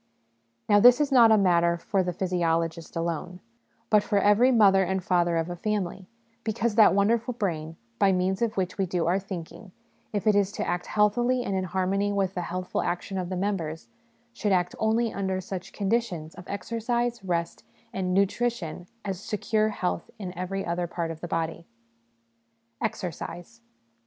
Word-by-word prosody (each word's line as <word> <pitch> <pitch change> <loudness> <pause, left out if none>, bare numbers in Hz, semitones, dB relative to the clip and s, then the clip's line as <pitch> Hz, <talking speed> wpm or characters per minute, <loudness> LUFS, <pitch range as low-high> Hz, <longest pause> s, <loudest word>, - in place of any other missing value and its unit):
Now, 205 -1 +5
this 245 +4 +7
is 295 -1 +1
not 235 -4 +7
a 220 - +6
matter 170 -3 +3
for 190 +3 0
the 180 -1 -1
physiologist 170 -2 -1
alone, 170 +2 -3 0.5
but 210 -1 +6
for 205 - 0
every 210 +6 +5
mother 200 -5 +5
and 190 0 -1
father 175 -2 +2
of 165 0 0
a 175 - -5
family; 195 -1 -3 0.4
because 225 +1 -1
that 215 -3 +6
wonderful 230 +4 +1
brain, 160 -7 -3 0.2
by 195 - +5
means 185 +2 0
of 230 -2 0
which 185 0 -2
we 190 - +1
do 175 -1 -1
our 180 +4 +2
thinking, 190 +1 -8 0.4
if 205 -1 -2
it 215 - +5
is 200 -1 +2
to 215 - -3
act 175 0 -2
healthily 240 +4 +2
and 195 - -2
in 190 -1 -1
harmony 190 +3 0
with 195 -2 0
the 180 - -3
healthful 180 +1 -3
action 190 +2 -3
of 180 -1 -4
the 185 - -3
members, 165 - -3 0.4
should 215 -3 -1
act 180 -2 +1
only 225 +1 +1
under 190 -1 -1
such 185 0 -6
conditions 195 -7 -1
of 180 - -12
exercise, 230 +3 -2
rest, 170 -2 -2 0.3
and 185 -1 -2
nutrition 195 -3 0 0.2
as 190 -3 -3
secure 215 +1 0
health 180 -5 -3
in 185 -4 -6
every 190 +2 -3
other 175 0 -1
part 170 -1 -3
of 160 -1 -9
the 175 - -4
body. 165 0 -3 1.1
Exercise. 175 +5 -5
190 Hz, 170 wpm, -27 LUFS, 175-210 Hz, 1.1 s, this